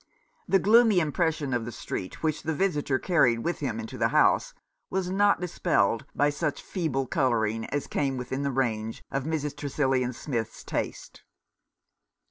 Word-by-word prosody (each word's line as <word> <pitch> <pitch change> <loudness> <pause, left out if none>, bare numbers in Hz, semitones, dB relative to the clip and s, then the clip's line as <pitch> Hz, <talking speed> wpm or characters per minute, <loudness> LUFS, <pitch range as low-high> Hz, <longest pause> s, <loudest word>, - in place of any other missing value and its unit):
The 195 - +5
gloomy 220 0 +5
impression 155 -2 0
of 120 -2 0
the 120 - -5
street 95 - -6
which 155 -1 0
the 160 0 -2
visitor 145 -7 +1
carried 125 -9 +2
with 170 - -1
him 120 -6 -2
into 110 - -7
the - - +3
house - - +3 0.4
was 185 -1 -1
not 200 +1 +3
dispelled 115 - +1
by 145 +1 +3
such 145 0 -2
feeble 145 -7 -1
colouring 115 -6 0
as 145 - -2
came 135 -2 -1
within 130 +2 -3
the 140 - 0
range 115 -4 -2
of 135 0 -2
Mrs. 150 -2 -2
Tresillian 135 -3 0
Smith's 115 -4 -4
taste. - - -4
140 Hz, 155 wpm, -27 LUFS, 125-160 Hz, 0.4 s, The